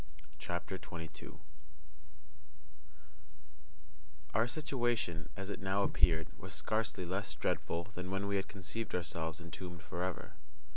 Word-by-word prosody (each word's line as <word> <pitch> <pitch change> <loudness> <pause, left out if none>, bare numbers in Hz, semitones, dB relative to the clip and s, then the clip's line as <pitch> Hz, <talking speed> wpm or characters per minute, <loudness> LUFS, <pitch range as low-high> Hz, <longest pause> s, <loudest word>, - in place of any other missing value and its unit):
CHAPTER 85 +3 -2
22 80 -1 -6 3.0
Our 110 +3 +5
situation, 120 - +1
as 100 +1 -2
it - - -3
now 95 +1 +3
appeared, 80 -4 +5
was - - -5
scarcely 110 -4 +1
less 95 -2 0
dreadful 85 +2 +1
than 90 -2 -5
when 95 +1 +1
we 100 0 +3
had 95 - 0
conceived 100 +3 -2
ourselves 80 -1 0
entombed 85 0 -5
forever. 90 +3 -1
90 Hz, 110 wpm, -37 LUFS, 85-100 Hz, 3.0 s, Our